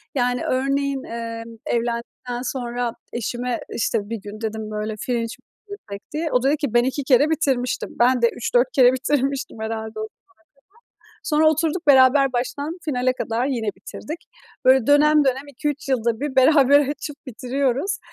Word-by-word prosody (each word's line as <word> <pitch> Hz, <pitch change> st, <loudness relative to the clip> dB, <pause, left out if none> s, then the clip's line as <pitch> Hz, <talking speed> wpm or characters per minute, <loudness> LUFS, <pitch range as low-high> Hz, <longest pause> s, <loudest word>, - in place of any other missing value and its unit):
Yani, 245 Hz, -2 st, 0 dB
örneğin, 275 Hz, +1 st, 0 dB
eee, 230 Hz, 0 st, -5 dB, 0.2 s
evlendikten 240 Hz, +1 st, -3 dB
sonra 245 Hz, -2 st, -3 dB, 0.2 s
eşime, 240 Hz, +1 st, -2 dB
işte, 210 Hz, -2 st, -1 dB
bir 230 Hz, -, -3 dB
gün 210 Hz, +2 st, -9 dB
dedim, 220 Hz, -1 st, -4 dB
böyle, 215 Hz, 0 st, -3 dB
"Fringe 245 Hz, -2 st, 0 dB
mi 230 Hz, -, -2 dB, 0.4 s
izlesek?" 205 Hz, -, -9 dB
diye. 315 Hz, +1 st, -2 dB
O 250 Hz, 0 st, +2 dB
da -, -, +3 dB
dedi 300 Hz, -, +2 dB
ki 280 Hz, -6 st, -3 dB
ben 240 Hz, 0 st, +5 dB
2 265 Hz, +2 st, -2 dB
kere 275 Hz, +3 st, +4 dB
bitirmiştim, 270 Hz, -6 st, 0 dB
ben 250 Hz, 0 st, +4 dB
de 235 Hz, -, +5 dB
3-4 245 Hz, +1 st, +1 dB
kere 255 Hz, -1 st, +6 dB
bitirmiştim 270 Hz, -1 st, -1 dB
herhâlde 220 Hz, 0 st, -4 dB
o -, -, -3 dB
zamana 220 Hz, -, -5 dB
kadar. -, -, -75 dB, 1.0 s
Sonra 310 Hz, 0 st, +4 dB
oturduk 320 Hz, +2 st, -1 dB
beraber 265 Hz, 0 st, +6 dB
baştan 285 Hz, +7 st, -3 dB
finale 255 Hz, -3 st, +1 dB
kadar 235 Hz, 0 st, -2 dB
yine 240 Hz, -6 st, -2 dB
bitirdik. 300 Hz, -, -8 dB, 0.4 s
Böyle, 260 Hz, -1 st, +5 dB
dönem 300 Hz, +1 st, +5 dB
dönem 270 Hz, +2 st, 0 dB
2-3 285 Hz, +1 st, -4 dB
yılda 235 Hz, -3 st, 0 dB
bir 285 Hz, -2 st, -3 dB
beraber 280 Hz, +1 st, +6 dB
açıp 290 Hz, 0 st, -6 dB
bitiriyoruz. 270 Hz, -, -1 dB
255 Hz, 160 wpm, -22 LUFS, 235-285 Hz, 1.0 s, kere